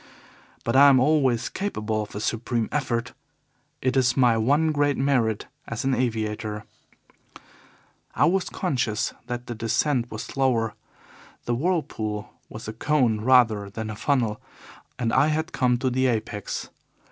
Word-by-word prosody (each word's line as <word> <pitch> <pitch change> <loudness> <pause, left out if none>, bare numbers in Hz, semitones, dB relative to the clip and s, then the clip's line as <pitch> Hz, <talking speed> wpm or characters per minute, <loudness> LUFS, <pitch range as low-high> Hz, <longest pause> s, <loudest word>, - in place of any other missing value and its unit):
But 115 - -1
I 140 +1 +8
am 135 -2 +6
always 130 -4 +2
capable 110 - -2
of 105 - -8
a - - -3
supreme 115 +1 -1
effort 125 -4 -1 0.7
it 130 0 +1
is 130 -1 +2
my 125 -3 +5
one 145 +8 +2
great 145 -2 +1
merit 125 -6 +1 0.2
as 115 +2 -4
an 135 - +2
aviator. 110 -3 -2 1.5
I - - +4
was 185 +1 +1
conscious 125 - -1
that 120 0 -4
the 120 - -5
descent 120 +3 0
was 110 - -5
slower. 120 -5 0 0.7
The 120 - 0
whirlpool 115 - -2 0.2
was 110 - -9
a 110 - -4
cone 120 -4 +1
rather 115 -5 +4
than 110 +2 -5
a - - -6
funnel, 115 -3 0 0.6
and 115 -2 -1
I 145 - +4
had 160 +3 -1
come 125 -2 +2
to 130 +1 -1
the 130 +1 +2
apex. 110 -3 -3
120 Hz, 145 wpm, -25 LUFS, 110-135 Hz, 1.5 s, I